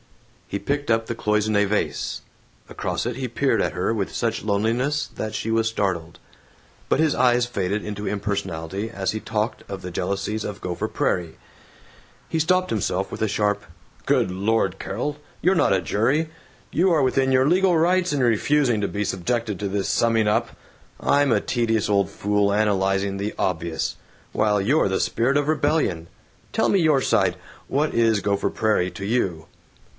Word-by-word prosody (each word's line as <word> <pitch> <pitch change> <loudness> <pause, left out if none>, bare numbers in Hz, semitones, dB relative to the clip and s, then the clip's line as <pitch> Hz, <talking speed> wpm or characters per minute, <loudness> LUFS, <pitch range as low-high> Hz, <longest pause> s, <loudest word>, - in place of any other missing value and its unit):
He 100 - -3
picked 145 +3 -2
up 115 0 +2
the 115 - -3
cloisonne 105 -1 +1
vase. 105 +1 -2 0.4
Across - - -3
it 120 0 -2
he 130 -1 -2
peered 135 +4 +1
at - - 0
her 90 +5 0
with 100 -4 -2
such 115 -2 -1
loneliness 120 +8 0
that 110 0 -4
she 115 - -3
was 115 0 +2
startled. 90 -7 -2 0.7
But - - +2
his 160 -2 +3
eyes 125 -1 +3
faded 100 -3 -2
into 105 0 -5
impersonality 100 -1 -3
as 95 -4 -2
he 110 - -3
talked 110 0 -2
of 100 -1 -5
the 90 - -5
jealousies 100 +4 -2
of 105 -1 -5
Gopher 90 -1 -3
Prairie. 85 -3 -1 0.9
He 160 - -1
stopped 185 +3 +2
himself 95 -3 -1
with - - -6
a 110 - +1
sharp, 105 0 0 0.4
"Good - - +2
Lord, 100 +2 0
Carol, 145 +9 -3 0.2
you're 185 +3 +3
not - - +3
a 95 - +3
jury. 125 - +1 0.4
You 180 +3 +3
are 155 -4 +3
within 130 0 +2
your 130 +1 +4
legal 180 +1 +4
rights 180 +2 +2
in 145 -2 0
refusing 120 0 +2
to 100 - 0
be 105 0 -2
subjected 105 +3 -1
to 100 -1 -2
this 100 0 -1
summing 115 -2 +2
up. 105 - +1 0.5
I'm 145 -1 +3
a - - +4
tedious 115 -3 0
old 100 -2 +2
fool 105 0 +1
analyzing 100 -1 +1
the 100 +2 -3
obvious, 85 -3 -2 0.4
while 105 -1 +2
you're 120 +4 +2
the 95 - 0
spirit 130 +5 +1
of 145 0 0
rebellion. 145 - +1 0.4
Tell - - +1
me 195 - +3
your 155 -4 +4
side. - - +2 0.3
What 150 +3 0
is 115 -2 +3
Gopher 100 0 0
Prairie 105 -4 +1
to 100 - -7
you?" 95 -8 -1
110 Hz, 170 wpm, -23 LUFS, 100-130 Hz, 0.9 s, your